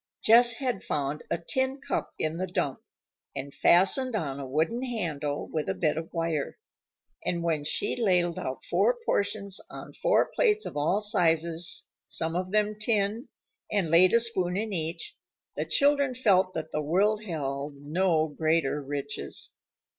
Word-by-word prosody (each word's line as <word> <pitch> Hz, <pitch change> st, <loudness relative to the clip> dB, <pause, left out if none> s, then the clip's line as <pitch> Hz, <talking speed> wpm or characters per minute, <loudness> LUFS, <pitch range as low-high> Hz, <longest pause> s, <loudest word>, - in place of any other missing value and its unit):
Jess 235 Hz, +2 st, +7 dB
had 245 Hz, -5 st, -3 dB
found 145 Hz, 0 st, -2 dB
a -, -, 0 dB
tin 260 Hz, +10 st, -2 dB
cup -, -, -3 dB
in 155 Hz, +1 st, -2 dB
the 185 Hz, +1 st, -2 dB
dump, 145 Hz, -7 st, -2 dB, 0.6 s
and 140 Hz, +1 st, -6 dB
fastened 220 Hz, +8 st, +4 dB
on 140 Hz, -8 st, -3 dB
a 135 Hz, -, -6 dB
wooden 160 Hz, -, 0 dB
handle 160 Hz, -, -3 dB
with 155 Hz, +2 st, -3 dB
a 190 Hz, -, -1 dB
bit 165 Hz, -5 st, 0 dB
of 160 Hz, +1 st, -6 dB
wire. 165 Hz, -4 st, -2 dB, 0.7 s
And 170 Hz, -1 st, -2 dB
when 160 Hz, -3 st, 0 dB
she 150 Hz, -, 0 dB
ladled 180 Hz, -7 st, +1 dB
out 130 Hz, -, -5 dB
four -, -, +2 dB
portions 200 Hz, -1 st, 0 dB
on -, -, -10 dB
four -, -, +1 dB
plates 430 Hz, -3 st, +2 dB
of -, -, -6 dB
all 160 Hz, +8 st, +1 dB
sizes, 170 Hz, -5 st, +3 dB, 0.2 s
some 165 Hz, 0 st, -1 dB
of 185 Hz, +1 st, -2 dB
them 210 Hz, 0 st, 0 dB
tin, 215 Hz, +1 st, 0 dB, 0.4 s
and 190 Hz, -7 st, 0 dB
laid 180 Hz, +5 st, +6 dB
a -, -, +6 dB
spoon 190 Hz, -6 st, 0 dB
in 215 Hz, 0 st, -3 dB
each, 165 Hz, -1 st, -3 dB, 0.4 s
the -, -, -2 dB
children 280 Hz, -2 st, +2 dB
felt 190 Hz, -6 st, +2 dB
that 160 Hz, -, -5 dB
the 150 Hz, -, -1 dB
world 205 Hz, +8 st, +1 dB
held 145 Hz, -4 st, -4 dB
no 160 Hz, +3 st, 0 dB
greater 155 Hz, -1 st, 0 dB
riches. 140 Hz, 0 st, -4 dB
175 Hz, 160 wpm, -27 LUFS, 155-215 Hz, 0.7 s, Jess